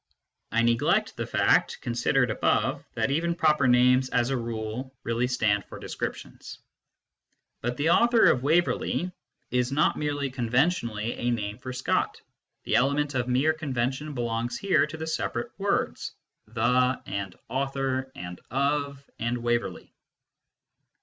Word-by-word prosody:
(I 115 +1 +2
neglect 115 0 +2
the - - -4
fact, - - +2
considered 120 +1 +1
above, - - +1
that - - 0
even 170 +4 0
proper 155 -5 +3
names, 125 +1 +4
as 125 +1 +1
a - - +1
rule, 115 +2 -4
really 115 +2 0
stand 110 -5 +1
for - - -10
descriptions.) - - -6 1.0
But 120 +1 -2
the 155 +3 +2
author 235 +3 +5
of 125 - 0
Waverley 175 +4 +1 0.4
is 125 0 +1
not 150 +3 +2
merely 145 -2 -1
conventionally 120 -3 0
a 120 - -2
name 105 -2 -2
for 130 - -6
Scott; 130 +1 -1 0.4
the - - +2
element 140 +3 +1
of 125 -2 -1
mere 135 +5 +3
convention 140 -1 -2
belongs 120 -1 -2
here 170 -8 +2
to 155 +1 -8
the 160 - -4
separate 165 +8 -2
words, 200 +1 -1 0.3
the 125 +3 +2
and 100 -2 -4
author 135 -1 -2
and 90 0 -8
of 140 +1 -1
and 115 +2 -1
Waverley. 120 0 -2
130 Hz, 135 wpm, -27 LUFS, 120-145 Hz, 1.0 s, author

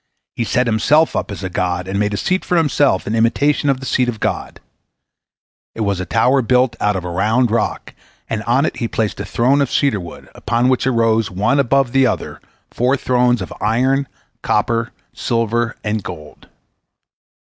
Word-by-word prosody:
He - - -1
set 125 +3 +1
himself 145 +8 +2
up - - -2
as 100 -1 -7
a 95 - -3
god, 90 0 -2
and 100 +1 -2
made 105 0 0
a - - -3
seat 185 - 0
for 180 - 0
himself 145 - +2
in 105 - -3
imitation 140 +6 +2
of 135 -2 +1
the 135 - -8
seat 125 -1 +1
of 110 -3 -5
God. - - -3 1.2
It 115 - -5
was 100 -3 0
a 90 - -4
tower 130 - +3
built 125 0 +2
out 105 -1 +1
of 90 -2 -4
a 90 - -4
round 110 +6 +1
rock, 115 - -2 0.3
and 110 - -3
on 130 +5 +2
it - - -3
he 115 - -2
placed 110 -2 -2
a - - -4
throne 135 +4 +2
of 140 - -1
cedar 135 -8 +1
wood, 85 -2 -10
upon 120 +2 0
which 130 0 +1
arose, 115 -3 +2
one 105 +10 +1
above 135 -1 +2
the 135 0 +4
other, 110 - -4 0.3
four 125 +3 +1
thrones, 125 -4 +1
of - - -8
iron, 130 +6 +1 0.3
copper, 115 +2 0 0.2
silver, 115 0 -1
and 105 0 -1
gold. 75 -5 -10
115 Hz, 190 wpm, -18 LUFS, 105-130 Hz, 1.2 s, the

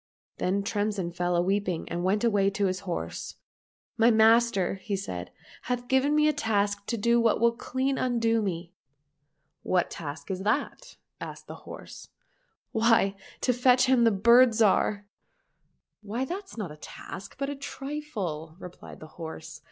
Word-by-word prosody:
— - - -60
Then 195 +2 0
Tremsin 205 -4 -1
fell 175 0 -1
a 175 - +3
weeping 190 -3 -1
and 175 +1 -3
went 200 +4 +1
away 205 -4 +3
to 200 0 -1
his 185 -1 -1
horse. 170 - -5 0.3
" - - -59
My 230 +1 +6
master," 220 -4 +4
said 90 - -5
he, - - -34 0.2
" - - -21
hath 245 0 -2
given 265 +3 +2
me 300 0 +4
a 305 - +3
task 205 -3 0
to 235 - -1
do 235 +2 +3
that 225 - +3
will 235 +1 +4
clean 260 +3 -2
undo 230 -2 +1
me." 175 -3 -4 0.3
— 145 0 -50
" - - -50
What 180 -1 +2
task 145 0 -6
is 190 0 -3
that? 215 +8 -2
" - - -44
asked - - -7
the - - -8 0.2
horse. - - -10 0.2
— - - -43
" - - -57
Why, 225 -4 +3 0.3
to 250 - +2
fetch 250 +1 +4
him 255 -2 +4
the 230 - +6
Bird 235 +4 +5
Zhar."— 205 -1 +2 0.5
" - - -48
Why 220 +5 -3
that's 380 +1 -7
not 200 -8 -4
a 150 - -11
task, 180 +5 -9
but 275 +1 -2
a - - -4
trifle," 270 - -5
replied 180 -2 -11
the 155 - -9
horse. 160 0 -7
210 Hz, 185 wpm, -27 LUFS, 185-240 Hz, 0.5 s, My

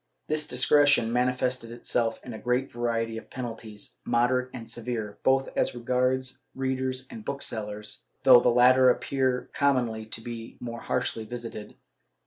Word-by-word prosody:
* - - -50
This 155 0 +2
discretion 130 -2 +4
manifested 125 -1 0
itself 120 -1 -1
in 125 - -7
a 110 - -7
great 125 +2 0
variety 115 -1 -1
of - - -17
penalties, 115 -4 -7
moderate 125 +2 +1
and 115 -2 -8
severe, 115 -3 -4
both 135 0 +2
as - - +1
regards 125 +1 0
readers 130 -1 -2
and 225 -2 -8
booksellers, 110 - -4 0.2
though 130 -2 +9
the 125 - +3
latter 125 +2 +6
appear 130 0 0
commonly 120 -6 +1
to 110 - -3
be 115 -1 -8
the - - -9
more 115 -1 -5
harshly 125 -3 -1
visited. 115 -2 -7
125 Hz, 150 wpm, -27 LUFS, 115-130 Hz, 0.2 s, though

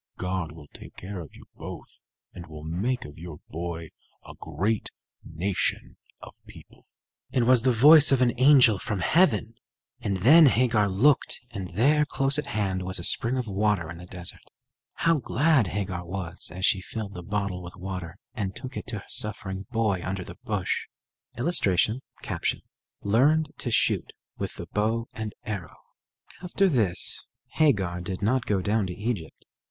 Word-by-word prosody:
God 90 -3 -3
will 80 -1 -12
take - - -13
care 95 +1 -7
of 80 - -10
you - - -13
both, - - -10 0.3
and 85 -1 -10
will 75 -1 -10
make 100 +11 -2
of 75 +2 -11
your 85 -3 -8
boy 85 0 -5 0.4
a - - -10
great 95 +8 -2 0.3
nation 90 +4 -2 0.3
of - - -11
people." - - -16 0.4
It 125 - +2
was 125 0 +5
the 130 - +3
voice 145 +6 +8
of 135 - +4
an 125 -2 +3
angel 130 -7 +7
from 105 -4 -3
heaven; 160 - +2 0.5
and 100 -2 -2
then 150 - +7
Hagar 115 -5 +2
looked, 125 +10 +2
and 95 -5 -6
there, 145 +8 +4
close 135 0 +2
at 145 - -4
hand, 95 -5 -1
was 95 0 -3
a 85 - -5
spring 120 +8 +1
of 125 - -2
water 100 -4 0
in 85 - -9
the 90 - -11
desert. 90 -1 -7 0.5
How 165 -2 +2
glad 135 - +2
Hagar 95 -3 -3
was 90 0 -6
as 95 +2 -2
she 95 -2 +2
filled 100 +1 -6
the 90 - -7
bottle 100 -1 -3
with 90 0 -10
water 90 -2 -6 0.2
and 100 -6 -4
took 130 0 -8
it - - -6
to 115 -3 -4
her - - -17
suffering 95 -2 -3
boy 110 -6 0
under 95 0 -3
the - - -11
bush! - - -2 0.5
[Illustration: 120 - +2 1.0
Learned 145 +9 +3
to 125 - -3
shoot 115 - +1 0.2
with - - -5
the - - -7
bow 115 +2 -1
and 110 -1 -6
arrow] 100 -8 -6 0.6
After 185 +2 +1
this 110 - +1 0.3
Hagar 95 - +1
did 90 +2 -5
not 125 +3 +1
go 95 -3 0
down 105 0 +1
to 90 - -5
Egypt. 105 -6 -5
105 Hz, 170 wpm, -26 LUFS, 90-125 Hz, 1.0 s, voice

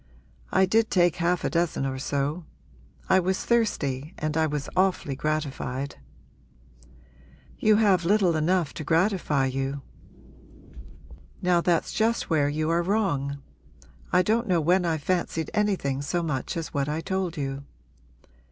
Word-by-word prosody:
I 190 - +4
did 220 +4 +2
take 175 -2 +3
half 175 0 0
a - - 0
dozen 170 -4 0
or 130 -1 -3
so; 145 +4 -2 0.6
I 190 - +5
was 185 +1 -1
thirsty 155 - 0
and 155 0 -2
I 160 -1 +2
was 150 -1 -3
awfully 185 -7 +1
gratified.' 140 -2 -3 1.6
'You 215 0 +4
have 200 -5 +3
little 185 -2 +3
enough 165 0 +1
to 155 - -6
gratify 165 -3 +1
you.' 135 +1 -3 1.6
'Now 180 -1 +3
that's 170 -1 +1
just 225 -3 0
where 145 -3 +3
you 155 +1 -1
are 170 +1 +2
wrong. 145 -8 -1 0.7
I 180 +1 +4
don't 225 +5 +1
know 180 -3 +2
when 175 +3 +2
I've 160 -3 -1
fancied 170 -3 -1
anything 190 -11 0
so 170 +4 -1
much 150 -1 -3
as 165 -2 -5
what 140 0 -1
I 155 +2 -2
told 190 -2 -2
you.' 135 -1 -3
165 Hz, 145 wpm, -26 LUFS, 145-185 Hz, 1.6 s, I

